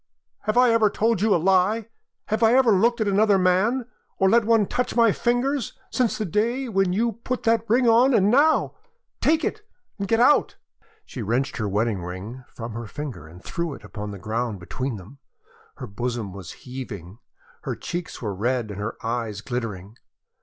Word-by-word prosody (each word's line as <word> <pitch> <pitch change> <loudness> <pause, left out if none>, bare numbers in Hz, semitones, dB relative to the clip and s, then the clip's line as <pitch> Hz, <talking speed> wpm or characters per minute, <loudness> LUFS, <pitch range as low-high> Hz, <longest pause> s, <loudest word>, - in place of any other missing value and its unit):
Have 215 +2 0
I 250 -1 +6
ever 225 -2 +4
told 220 -1 0
you 215 -2 +4
a - - +4
lie? 190 +5 +2 0.4
Have 215 +1 0
I 230 +2 +5
ever 260 -3 +5
looked 235 +5 +3
at 215 - +1
another 200 0 +4
man, 190 +8 +2 0.3
or 190 0 +3
let 235 -2 +4
one 225 -2 +4
touch 250 +5 -2
my 230 -2 +5
fingers, 245 +4 -1
since 250 -4 +1
the 215 - -2
day 235 +8 0
when 195 -4 +1
you 225 +3 0
put 255 -1 -3
that 230 0 +1
ring 245 +2 +3
on? 235 +4 +5
And 205 -1 +4
now 295 +5 +3 0.5
take 320 +1 +3
it 430 - -3 0.4
and 200 - -2
get 225 +2 +2
out!" 255 +5 +4 0.5
She 125 - -7
wrenched 120 +6 -1
her 105 -3 -2
wedding 105 -1 0
ring 95 +9 -7
from 115 0 -8
her 115 0 -6
finger 125 - -7
and 90 +4 -14
threw 170 -4 -3
it - - -15
upon 105 +1 -7
the 100 - -7
ground 110 +1 -3
between 125 +8 -4
them. 105 +9 -13 0.6
Her - - -7
bosom 115 -1 -4
was 95 -4 -9
heaving; 115 -7 -8 0.4
her - - -4
cheeks 175 -6 -6
were 105 -3 -2
red 115 +2 -1
and 100 - -7
her 105 +2 -4
eyes 115 -3 -3
glittering. 110 -4 -5
180 Hz, 190 wpm, -24 LUFS, -, 0.6 s, I